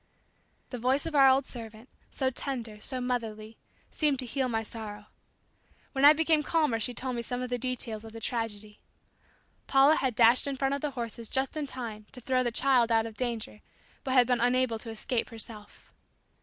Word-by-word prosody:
The 250 - -5
voice 260 +4 +1
of 325 - -4
our 275 -2 +7
old 265 +1 +3
servant, 225 -2 -8 0.2
so 260 -1 -1
tender, 235 -5 -5
so 260 +2 -1
motherly, 225 -3 -4 0.3
seemed 295 -3 +1
to 255 - -3
heal 260 +1 -1
my 225 -1 -1
sorrow. 210 -2 -8 0.9
When 275 0 +2
I 295 - +10
became 315 0 +2
calmer 300 -7 +1
she 235 +3 +1
told 255 +1 -4
me 235 - -2
some 245 +1 -3
of 250 - -5
the 245 - -1
details 235 -3 -2
of 225 - -10
the 225 - -9
tragedy. 215 -3 -4 0.9
Paula 275 +3 +5
had, 255 -4 -1
dashed 235 +4 +5
in 275 -1 -2
front 270 +1 0
of 280 - -2
the 300 - -1
horses 230 -1 -5
just 265 +2 -1
in 300 -2 -3
time 225 -5 -7
to 255 - -6
throw 255 +1 +1
the 240 -1 0
child 245 -1 +3
out 225 -1 +3
of 225 - -7
danger 230 -4 -4 0.4
but 260 -1 -1
had 250 -1 +7
been 245 -1 +1
unable 245 -2 +2
to 230 - -8
escape 225 +2 -2
herself. 220 -2 -9
245 Hz, 195 wpm, -29 LUFS, 225-265 Hz, 0.9 s, I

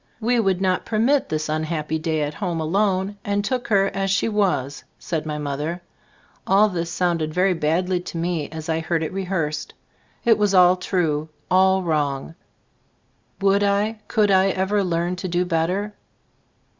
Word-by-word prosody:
"We 240 +1 +1
would 190 -4 +1
not 185 -1 +1
per 215 - -3
mit 265 +6 +2
this 155 0 -2
unhappy 155 0 -2
day 155 -1 -1
at 145 +1 -3
home 175 -2 -3
alone, 190 +4 0
and 205 0 -1
took 250 +2 -2
her 195 -3 +2
as 195 0 -1
she 200 +3 +1
was," 185 - 0
said 160 -2 -4
my 150 -1 -3
mother. 150 +4 -3 0.7
All 205 +3 +5
this 170 -3 -3
sounded 165 -3 -1
very 185 +1 +3
badly 175 +3 0
to 175 -1 -7
me 165 -3 -2
as 160 0 -7
I 160 0 0
heard 165 0 -1
it 160 - -4
rehearsed. 180 -6 -3 0.5
It 225 -2 +4
was 205 -2 +2
all 180 0 +7
true, 160 -5 -1 0.2
all 190 +1 +4
wrong; 150 -3 -1 1.1
would 200 +1 +3
I, 205 +2 +1
could 210 -2 +2
I 190 0 +5
ever 195 +2 0
learn 175 0 -1
to 185 - -4
do 175 +1 0
better? 180 +5 -1
180 Hz, 170 wpm, -22 LUFS, 160-195 Hz, 1.1 s, all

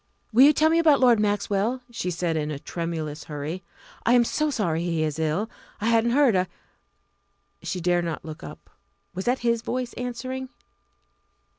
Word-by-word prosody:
"Will 240 - +6
you 295 - +8
tell 310 +2 +3
me 330 - +4
about 310 -4 +5
Lord 245 -4 +5
Maxwell?" 210 +3 0
she 205 -6 -3
said 170 -1 -1
in 150 -1 -1
a 150 - -3
tremulous 160 -1 -4
hurry. 150 +5 -5 0.4
"I 235 - +3
am 245 -1 +6
so 305 +6 0
sorry 175 - 0
he 165 -2 0
is 155 0 -2
ill 160 +7 0 0.3
I 220 - 0
hadn't 230 0 +3
heard 275 -8 +5
I 185 0 +2 0.6
" - - -46
She 185 - -3
dared 175 0 +2
not 165 -1 -4
look 155 -1 -8
up. 75 - -11 0.4
Was 190 +1 -5
that 250 +2 +2
his 235 -1 +2
voice 250 0 -3
answering? 255 +2 -5
205 Hz, 180 wpm, -25 LUFS, 165-245 Hz, 0.6 s, you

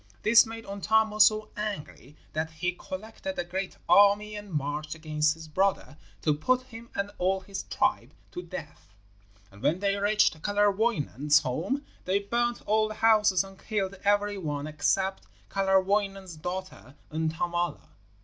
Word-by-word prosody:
This 230 +2 +7
made 225 0 -8
Untamo 215 +2 +1
so 215 0 +5
angry 195 - -6 0.2
that 155 +1 -1
he 160 +3 -2
collected 220 +10 -7
a - - 0
great 185 +2 -4
army 205 +1 +5
and 205 -1 -8
marched 150 +1 -3
against 155 -1 0
his 160 0 -11
brother 185 -1 0 0.3
to 155 - +3
put 255 +13 +1
him 235 -2 -12
and 200 +1 -2
all 190 +1 +1
his 195 +1 -6
tribe - - 0 0.2
to 180 - -5
death. 160 - -10 0.6
And 100 +1 -15
when 170 - +2
they 200 0 +1
reached 205 -5 +2
Kalerwoinen's 205 - +2
home 195 - -2 0.2
they 185 +2 +2
burned 235 +4 -1
all 215 +1 +2
the 215 - -7
houses 215 -4 +4
and 195 0 -13
killed 200 -3 -2
every 205 0 +2
one 145 -4 -3
except 170 +6 0 0.2
Kalerwoinen's 195 -1 +1
daughter 180 -4 -6 0.2
Untamala. 160 - -2
195 Hz, 145 wpm, -28 LUFS, 160-210 Hz, 0.6 s, This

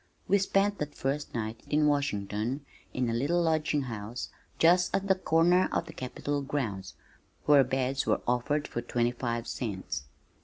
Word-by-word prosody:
We 200 +2 +4
spent 195 +1 +1
that 150 0 -4
first 140 +1 -2
night 110 0 -3
in 150 0 +3
Washington 130 -2 0 0.3
in 125 -1 -1
a 115 - 0
little 145 +9 +1
lodging 155 -3 +1
house 115 -1 -5 0.3
just 175 +2 +4
at 195 0 -1
the 190 - +6
corner 175 0 +3
of - - 0
the 160 - -10
Capitol 145 +1 -3
grounds 115 -10 -3 0.5
where 145 -2 +7
beds 130 +1 -1
were - - +2
offered 125 +5 +1
for 120 - -3
twenty 120 0 0
five 120 -1 -3
cents. 95 - -4
135 Hz, 160 wpm, -29 LUFS, 120-160 Hz, 0.5 s, where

